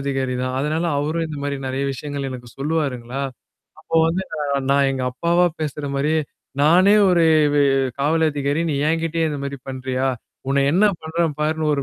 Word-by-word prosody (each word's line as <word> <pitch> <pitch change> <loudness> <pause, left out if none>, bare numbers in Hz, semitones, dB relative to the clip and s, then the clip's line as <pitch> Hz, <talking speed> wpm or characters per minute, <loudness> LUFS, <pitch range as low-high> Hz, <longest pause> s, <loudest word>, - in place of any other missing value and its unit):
அதிகாரி 135 -2 -1
தான். 130 0 -2
அதனால 155 +4 -1
அவரும் 160 +3 -1
இந்தமாரி 145 -2 -4
நிறைய 135 +1 -2
விஷயங்கள் 140 +1 -5
எனக்குச் 120 -2 -9
சொல்லுவாருங்களா. 135 -4 -2 0.6
அப்ப - - -20
வந்து 175 +3 0 0.5
நான் 140 0 +4
எங்கப்பாவா 135 +7 +1
பேசுற 150 -1 -3
மாரியே 155 +3 +1 0.4
நானே 185 +7 +6 0.2
ஒரு 170 -2 +4 0.3
வெ 145 - +4 0.4
காவல் 160 +3 +2
அதிகாரி. 145 +1 -1
நீ - - -1
என்கிட்டேயே 165 0 0
இந்தமாரி 140 -1 -4
பண்றியா! 130 0 -2 0.4
உன்ன 140 0 +2
என்ன 190 +6 +4 0.2
பண்றேன் 160 -1 -1
பாருன்னு 155 0 0
ஒரு 140 - -1
145 Hz, 145 wpm, -21 LUFS, 135-160 Hz, 0.6 s, நானே